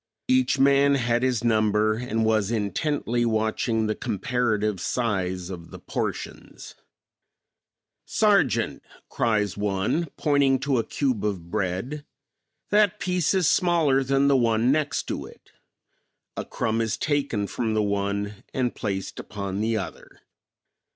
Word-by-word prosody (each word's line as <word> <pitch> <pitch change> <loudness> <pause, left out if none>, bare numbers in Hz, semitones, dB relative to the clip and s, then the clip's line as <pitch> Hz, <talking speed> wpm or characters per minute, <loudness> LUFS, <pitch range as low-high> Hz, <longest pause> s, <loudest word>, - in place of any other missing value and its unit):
Each 260 - +3
man 140 +1 +4
had 120 -2 +1
his 125 -3 0
number 110 -2 +2
and 115 -1 -1
was 110 -2 +2
intently 120 - -1
watching 110 0 0
the 110 - 0
comparative 110 -2 -1
size 95 -7 -2
of 85 -3 -8
the - - -9
portions. - - -5 1.3
"Sergeant," - - +2 0.3
cries 105 -4 0
one, 105 - -1
pointing 140 -2 +3
to 135 -2 +1
a - - +1
cube 125 -1 -1
of 90 -5 -3
bread, 110 +9 -2 0.7
"That 205 -2 +3
piece 180 0 +1
is 185 -5 +3
smaller 165 -7 +3
than 135 +1 +2
the 140 - +4
one 115 0 +3
next 150 0 0
to - - -4
it." - - -18 0.8
A - - -4
crumb 115 0 -1
is 110 -1 -1
taken 140 -9 0
from 110 +2 -2
the 110 - +2
one 100 0 -2
and 125 -2 0
placed 95 -4 -4
upon 100 -1 -4
the 110 0 +1
other. 95 - -8
115 Hz, 130 wpm, -25 LUFS, 105-135 Hz, 1.3 s, man